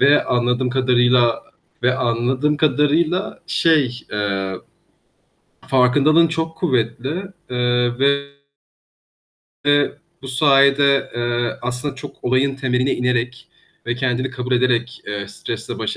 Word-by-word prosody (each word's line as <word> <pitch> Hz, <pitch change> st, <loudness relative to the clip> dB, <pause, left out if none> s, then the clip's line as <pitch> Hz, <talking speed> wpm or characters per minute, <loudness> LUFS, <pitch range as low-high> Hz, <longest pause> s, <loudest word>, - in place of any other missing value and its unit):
Ve 140 Hz, +2 st, +4 dB
anladığım 125 Hz, +1 st, 0 dB
kadarıyla 125 Hz, -2 st, +2 dB, 0.4 s
ve 125 Hz, +1 st, +2 dB
anladığım 130 Hz, +5 st, 0 dB
kadarıyla 155 Hz, +7 st, +1 dB
şey, 155 Hz, -8 st, +1 dB
eee, 100 Hz, -2 st, -2 dB, 1.1 s
farkındalığın 145 Hz, +6 st, +4 dB
çok 160 Hz, 0 st, -3 dB
kuvvetli, 130 Hz, -, -1 dB, 0.3 s
eee, 120 Hz, -1 st, +1 dB
ve 140 Hz, 0 st, +2 dB, 2.0 s
bu 135 Hz, -, -8 dB
sayede, 140 Hz, +1 st, +3 dB
eee, 120 Hz, 0 st, -2 dB
aslında 125 Hz, +3 st, -3 dB
çok 130 Hz, -, -11 dB
olayın 135 Hz, +2 st, +1 dB
temeline 130 Hz, 0 st, 0 dB
inerek 125 Hz, 0 st, -2 dB, 0.4 s
ve 120 Hz, -, -1 dB
kendini 130 Hz, +1 st, -1 dB
kabul 125 Hz, 0 st, -4 dB
ederek, 125 Hz, -1 st, 0 dB
eee, 100 Hz, -1 st, -5 dB
stresle 100 Hz, -, -6 dB
baş -, -, -3 dB
125 Hz, 105 wpm, -20 LUFS, 120-140 Hz, 2.0 s, Ve